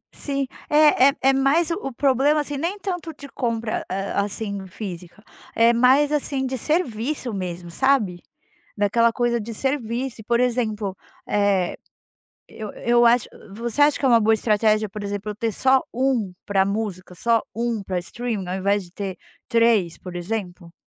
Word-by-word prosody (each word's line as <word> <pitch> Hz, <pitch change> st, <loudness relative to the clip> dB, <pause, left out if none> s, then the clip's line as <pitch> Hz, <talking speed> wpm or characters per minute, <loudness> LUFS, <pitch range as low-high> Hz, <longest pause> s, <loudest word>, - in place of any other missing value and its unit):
Sim, 275 Hz, -1 st, -1 dB, 0.2 s
é 295 Hz, -3 st, +6 dB
é -, -, -1 dB
é 270 Hz, +1 st, +4 dB
mais 275 Hz, +6 st, +2 dB
o -, -, +1 dB
o -, -, -4 dB
problema, 275 Hz, +3 st, +2 dB
assim, 290 Hz, 0 st, -5 dB
nem 340 Hz, +8 st, -2 dB
tanto 355 Hz, -4 st, -4 dB
de 285 Hz, -1 st, -11 dB
compra, 230 Hz, -4 st, -2 dB
hã, 195 Hz, +1 st, -1 dB
assim, 200 Hz, -1 st, -5 dB
física, 185 Hz, 0 st, -8 dB, 0.3 s
é 230 Hz, +1 st, +5 dB
mais, 260 Hz, +5 st, +4 dB
assim, 280 Hz, -2 st, -1 dB
de 260 Hz, 0 st, -2 dB
serviço 255 Hz, -3 st, -1 dB
mesmo, 180 Hz, -3 st, -5 dB
sabe, 215 Hz, -7 st, +1 dB, 0.6 s
daquela 230 Hz, +3 st, +3 dB
coisa 240 Hz, 0 st, +1 dB
de 230 Hz, +2 st, -6 dB
serviço. 255 Hz, -2 st, -2 dB
E -, -, -14 dB
por 235 Hz, +2 st, +1 dB
exemplo, 220 Hz, -5 st, 0 dB, 0.3 s
eh, 200 Hz, -3 st, +1 dB, 0.7 s
eu 215 Hz, -2 st, -8 dB
eu 240 Hz, 0 st, +3 dB
acho 235 Hz, 0 st, +3 dB, 0.3 s
você 235 Hz, +5 st, 0 dB
acha 290 Hz, 0 st, +4 dB
que 275 Hz, -, 0 dB
é -, -, +4 dB
uma 235 Hz, -2 st, +6 dB
boa 220 Hz, +1 st, +3 dB
estratégia, 215 Hz, 0 st, +2 dB
por 205 Hz, +1 st, -7 dB
exemplo, 205 Hz, +1 st, -4 dB
eu -, -, -15 dB
ter 225 Hz, 0 st, -1 dB
só 265 Hz, +4 st, +3 dB
um 245 Hz, -6 st, 0 dB
pra 195 Hz, -1 st, +2 dB
música, 200 Hz, -3 st, -4 dB
só 230 Hz, +5 st, +2 dB
um 230 Hz, -1 st, -2 dB
pra 185 Hz, -1 st, -2 dB
streaming, 215 Hz, +1 st, -4 dB
ao 185 Hz, -, -2 dB
invés 200 Hz, +1 st, +1 dB
de 175 Hz, -, -16 dB
ter 190 Hz, -1 st, -5 dB, 0.3 s
3, 230 Hz, -7 st, +2 dB
por 180 Hz, -1 st, -8 dB
exemplo? 175 Hz, -2 st, -5 dB
230 Hz, 170 wpm, -23 LUFS, 200-265 Hz, 0.7 s, é